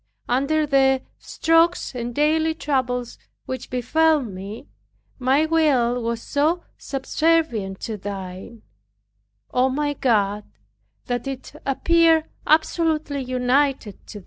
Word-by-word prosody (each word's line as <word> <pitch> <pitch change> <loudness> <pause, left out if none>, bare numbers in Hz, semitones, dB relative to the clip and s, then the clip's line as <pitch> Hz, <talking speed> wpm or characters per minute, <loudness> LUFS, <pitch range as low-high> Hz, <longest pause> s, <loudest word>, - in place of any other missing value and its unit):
Under 280 +5 +1
the 270 -2 +3 0.2
strokes 330 0 +1
and 240 -1 -5
daily 315 +2 +2
troubles 250 -6 -2 0.3
which 260 -1 -6
befell 310 +6 +2
me, 200 0 -8 0.5
my 265 +4 +3
will 270 -7 +2
was 230 0 -3
so 315 +5 0
subservient 270 -8 0
to 220 -2 -4
Thine, 195 +2 -8 0.9
O 255 +1 +3
my 290 +2 -1
God, 210 -6 +1 0.6
that 245 +1 -3
it 270 0 -6
appeared 325 +3 +3 0.2
absolutely 310 -2 +1
united 255 -3 0
to - - -9
it. - - -7
265 Hz, 110 wpm, -22 LUFS, 235-310 Hz, 0.9 s, the